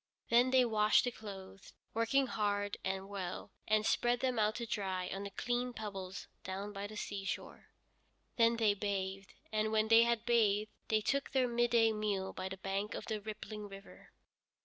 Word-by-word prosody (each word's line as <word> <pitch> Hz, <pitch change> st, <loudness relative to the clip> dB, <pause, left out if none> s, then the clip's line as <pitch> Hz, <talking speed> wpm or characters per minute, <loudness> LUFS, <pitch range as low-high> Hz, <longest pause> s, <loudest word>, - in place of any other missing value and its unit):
Then 240 Hz, +2 st, +5 dB
they 255 Hz, -1 st, +5 dB
washed 215 Hz, -2 st, +4 dB
the 245 Hz, -, 0 dB
clothes, 195 Hz, -4 st, -10 dB, 0.2 s
working 230 Hz, +5 st, +2 dB
hard 205 Hz, -3 st, -1 dB
and 190 Hz, 0 st, -2 dB
well, 190 Hz, -3 st, -5 dB, 0.2 s
and 215 Hz, 0 st, +3 dB
spread 240 Hz, +1 st, +2 dB
them 255 Hz, -3 st, 0 dB
out 215 Hz, 0 st, +2 dB
to 235 Hz, -, -3 dB
dry 190 Hz, -4 st, -2 dB
on 195 Hz, -, -4 dB
the 200 Hz, -, -4 dB
clean 245 Hz, +4 st, -2 dB
pebbles 195 Hz, -4 st, -6 dB, 0.2 s
down 195 Hz, +2 st, -5 dB
by 200 Hz, 0 st, -4 dB
the 215 Hz, +1 st, -9 dB
seashore. 200 Hz, -2 st, -5 dB, 0.7 s
Then 230 Hz, 0 st, +4 dB
they 220 Hz, -3 st, +4 dB
bathed, 195 Hz, -1 st, -3 dB, 0.2 s
and 215 Hz, 0 st, +1 dB
when 220 Hz, 0 st, +2 dB
they 225 Hz, 0 st, +8 dB
had 235 Hz, -1 st, +2 dB
bathed 215 Hz, -3 st, +3 dB, 0.2 s
they 215 Hz, -1 st, +2 dB
took 275 Hz, +5 st, 0 dB
their 260 Hz, -2 st, +3 dB
midday 235 Hz, -1 st, +3 dB
meal 205 Hz, -3 st, -1 dB
by 185 Hz, 0 st, -4 dB
the 190 Hz, -, -6 dB
bank 195 Hz, +2 st, -2 dB
of -, -, -5 dB
the 215 Hz, -2 st, -3 dB
rippling 215 Hz, 0 st, -6 dB
river. 195 Hz, 0 st, -12 dB
210 Hz, 175 wpm, -35 LUFS, 195-230 Hz, 0.7 s, they